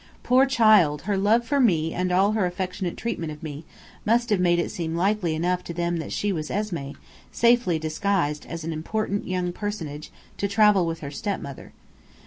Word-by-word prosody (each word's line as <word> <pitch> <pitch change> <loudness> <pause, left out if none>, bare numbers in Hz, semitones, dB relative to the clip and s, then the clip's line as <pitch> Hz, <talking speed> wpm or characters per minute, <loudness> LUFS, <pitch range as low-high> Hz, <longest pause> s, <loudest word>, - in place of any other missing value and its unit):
Poor 260 +2 +4
child, 215 - +4
her 205 +2 0
love 215 +5 +3
for 285 +4 +1
me 165 - +2
and 180 0 -1
all 190 +3 +3
her 215 -4 +1
affectionate 180 0 -4
treatment 185 -9 -3
of 150 +1 -10
me, 155 0 -7 0.4
must 235 +1 +1
have 205 - +3
made 175 -1 +3
it 170 - -1
seem 165 -1 -3
likely 180 -2 +1
enough 180 +3 0
to 170 - -7
them 170 0 -1
that 160 - -5
she 205 -1 -1
was 155 -3 -4
Esmé, 170 -10 -3 0.4
safely 235 -7 +3
disguised 155 -1 -1
as 165 -1 -6
an 165 +1 -3
important 200 +6 -2
young 180 -1 -2
personage, 165 -8 -5 0.3
to 200 - 0
travel 200 -3 +4
with 165 0 -4
her 140 -2 -6
stepmother. 145 -6 -5
180 Hz, 185 wpm, -25 LUFS, 160-210 Hz, 0.4 s, Poor